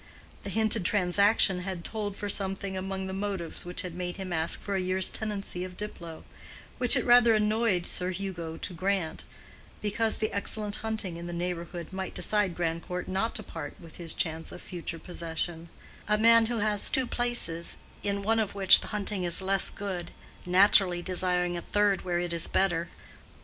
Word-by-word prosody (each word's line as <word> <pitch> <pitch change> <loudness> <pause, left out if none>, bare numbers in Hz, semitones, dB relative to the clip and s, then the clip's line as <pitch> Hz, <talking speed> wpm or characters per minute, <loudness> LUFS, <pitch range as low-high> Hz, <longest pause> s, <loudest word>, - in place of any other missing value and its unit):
The - - -6
hinted 220 -2 +1
transaction 195 +1 +3
had 180 -2 -5
told 210 -1 -3
for 205 - -4
something 195 -1 -2
among 190 0 -3
the 190 - -5
motives 195 -5 -4
which 175 0 -2
had 180 -2 -6
made 180 0 -4
him 190 -2 -5
ask 160 0 +1
for 200 - -3
a 190 - +1
year's 185 0 +3
tenancy 200 -4 -4
of 180 -1 -8
Diplow, 170 -6 -7 0.6
which 245 -2 +7
it - - +3
had - - -7
rather 240 -2 +7
annoyed 215 -3 +2
Sir 180 0 -2
Hugo 175 -4 -5
to - - -6
grant, 185 -1 -2 0.5
because 215 +2 0
the 215 - -1
excellent 205 +1 -2
hunting 220 -6 -3
in 170 0 -7
the 175 - -5
neighborhood 175 0 -4
might 190 -1 -5
decide 205 -5 0
Grandcourt 175 +1 -3
not 195 +5 -1
to 215 - -4
part 160 -6 -8
with 165 -2 -13
his 170 -2 -3
chance 165 -1 -2
of - - -9
future 175 -2 -6
possession;—a 170 +4 -4
man 230 +1 +6
who 235 0 -2
has 210 -1 +2
two 260 - +2
places, 240 -10 -1 0.2
in 200 0 -1
one 225 +2 +2
of 210 -2 -1
which 195 -2 +7
the - - -6
hunting 205 -2 -1
is 175 -1 +2
less 195 0 +3
good, 190 -4 -5 0.4
naturally 180 -1 +5
desiring 180 -1 0
a 170 - -3
third 205 +1 +1
where 175 -1 -1
it 175 -1 -2
is 170 -1 +6
better. 175 -3 +1
190 Hz, 180 wpm, -28 LUFS, 175-205 Hz, 0.6 s, which